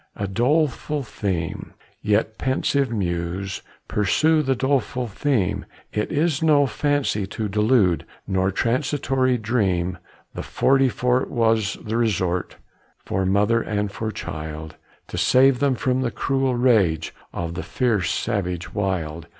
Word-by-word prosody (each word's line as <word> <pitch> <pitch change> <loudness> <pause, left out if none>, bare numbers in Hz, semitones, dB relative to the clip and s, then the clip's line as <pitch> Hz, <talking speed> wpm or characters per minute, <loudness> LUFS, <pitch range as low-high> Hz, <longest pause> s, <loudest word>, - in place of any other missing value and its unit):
A 100 - -3
doleful 145 +6 0
theme; 95 -8 -4 0.3
yet, 105 +1 0
pensive 135 +1 +1
muse, 95 -2 -2 0.3
Pursue 155 +10 +2
the 135 -2 +1
doleful 130 -2 0
theme; 105 -4 -1 0.3
It 105 - -1
is 155 -1 +1
no 150 -3 +5
fancy 145 -8 0
to 105 +2 -3
delude, 105 - +2 0.2
Nor 95 0 +1
transitory 130 +3 +1
dream. 95 -6 0 0.3
The - - -5
Forty 135 0 +2
Fort 125 +1 0
was 110 -2 +1
the 110 0 -2
resort 90 -6 0 0.5
For 95 0 -1
mother 105 +4 +3
and 105 -2 -2
for 110 +2 -4
child, 80 -5 -6 0.3
To - - -3
save 130 0 +4
them 140 -1 +2
from 130 +1 0
the 125 - 0
cruel 135 0 0
rage 100 -11 +2 0.2
Of 85 -1 -4
the 85 - -4
fierce 115 -7 0
savage 90 -6 -2
wild. 85 -5 -2
110 Hz, 130 wpm, -23 LUFS, 95-130 Hz, 0.5 s, no